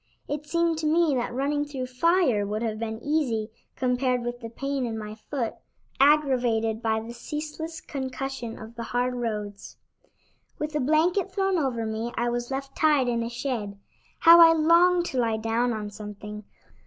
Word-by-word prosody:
It 295 +1 -4
seemed 335 0 +1
to 310 - -1
me 325 -1 +3
that 245 -2 -1
running 285 +4 0
through 275 -3 -5
fire 255 - +2
would 210 +3 -3
have 215 -2 -2
been 220 -1 -4
easy 245 -8 0 0.2
compared 250 -1 0
with 240 0 -4
the 230 -2 -7
pain 275 +3 -3
in 230 -2 -3
my 210 -1 -6
foot, 230 +2 -4 0.5
aggravated 250 -6 +3
by 220 -1 +1
the 225 +2 -8
ceaseless 310 +5 -6
concussion 265 -3 -5
of 220 +1 -10
the 235 - -7 0.2
hard 250 +1 +1
roads. 210 -4 -5 0.8
With 300 +1 -4
a 300 - 0
blanket 335 +7 +2
thrown 385 -2 +1
over 245 -6 -1
me, 220 +2 -3
I 240 +1 +1
was 240 0 -3
left 270 0 -5
tied 300 -5 +3
in 235 -1 0
a 230 - -3
shed. 235 -5 -4 0.4
How 335 0 +9
I 330 0 +9
longed 340 +2 +4
to 260 - -2
lie 225 -2 +1
down 225 +2 0
on 210 -2 -4
something! 210 0 -8
250 Hz, 175 wpm, -26 LUFS, 225-300 Hz, 0.8 s, How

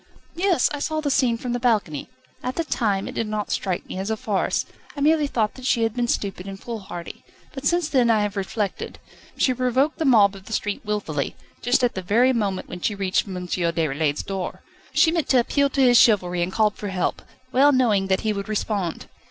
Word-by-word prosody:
"Yes; 355 -5 +2
I 290 - -3
saw 310 +2 -1
the 295 -2 -1
scene 255 -4 +2
from 245 0 -4
the 245 - -1
balcony. 210 - 0 0.3
At 255 - -3
the 335 - 0
time 210 -10 -1
it - - -6
did 225 - -2
not 210 -1 -3
strike 185 -3 -2
me 185 - -5
as 195 +2 -3
a 220 - -1
farce. 205 -3 0 0.3
I - - -3
merely 300 +1 +3
thought 220 -6 0
that 260 - -10
she 230 - +2
had 225 -1 0
been 240 0 -1
stupid 195 -4 -2
and 195 0 -7
foolhardy. 195 -7 -7 0.3
But 275 0 -2
since 345 0 +2
then 255 -6 +3
I 220 -2 +3
have 205 0 -3
reflected. 200 +1 -3 0.4
She 255 - +3
provoked 255 +4 +1
the 320 - 0
mob 210 -7 +5
of 195 0 -12
the 220 - -7
street, 205 -1 -2
wilfully, 190 -9 -2 0.3
just 245 +1 +2
at 245 - +2
the 190 - -4
very 235 +8 +3
moment 200 -5 -1
when 180 - -8
she 210 - 0
reached 195 +1 0
M. 180 -2 -5
Déroulède's 160 -4 0
door. 195 -2 -5 0.3
She 320 - +4
meant 335 -2 -1
to 260 - +5
appeal 280 +4 +2
to 275 - 0
his 245 -1 +6
chivalry, 180 -6 +3
and 175 +2 -1
called 210 0 +1
for 205 - -5
help, 190 -2 -1 0.3
well 275 +3 +5
knowing 220 -8 +2
that 190 0 +1
he 215 -1 0
would 200 0 -5
respond." 205 -5 -2
215 Hz, 220 wpm, -23 LUFS, 195-255 Hz, 0.4 s, his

